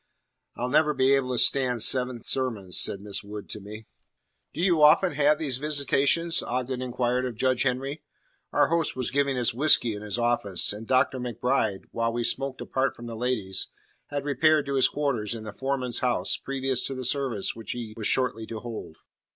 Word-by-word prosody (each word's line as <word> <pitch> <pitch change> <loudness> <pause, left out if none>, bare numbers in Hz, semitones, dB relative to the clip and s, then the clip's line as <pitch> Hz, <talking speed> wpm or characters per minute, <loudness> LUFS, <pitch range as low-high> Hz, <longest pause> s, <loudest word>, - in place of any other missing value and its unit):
"I'll 125 - -3
never 150 +2 +3
be 135 +1 +3
able 135 -2 +1
to - - -2
stand 125 -1 +3
seven 125 -2 +3
sermons," 110 -9 -2
said 100 - 0
Miss 100 0 -5
Wood 105 0 -8
to - - -5
me. 105 +2 -10 0.7
"Do - - -9
you 175 -3 +3
often 155 +5 +6
have 150 +1 +3
these 135 -5 -2
visitations?" 150 +3 +2
Ogden 125 +1 -3
inquired 125 0 -1
of 120 - -6
Judge 130 +2 +1
Henry. 135 +3 -1 0.5
Our - - +3
host 165 -1 0
was 130 -2 -2
giving 140 -1 +1
us 120 -2 +1
whisky 125 -3 +4
in 105 - -7
his 105 -1 -3
office, 120 -6 +1
and 110 +2 -9
Dr. 130 0 +2
MacBride, 125 -4 -1
while 115 0 -1
we 120 +1 -2
smoked 135 +2 -1
apart 135 +1 -1
from 120 - -10
the 115 -1 -6
ladies, 110 -5 0 0.4
had 145 -1 -4
repaired 150 +2 +3
to 140 - -3
his 135 -1 +4
quarters 125 -7 -2
in 110 - -7
the 105 -1 -7
foreman's 135 -3 -1
house 125 -1 +1
previous 135 -2 -2
to 135 - -5
the 130 -1 -4
service 130 -6 -1
which 115 -1 -5
he 115 -3 -7
was 110 -3 -2
shortly 125 -4 0
to 115 - -6
hold. 110 -9 -8
125 Hz, 190 wpm, -26 LUFS, 115-140 Hz, 0.7 s, often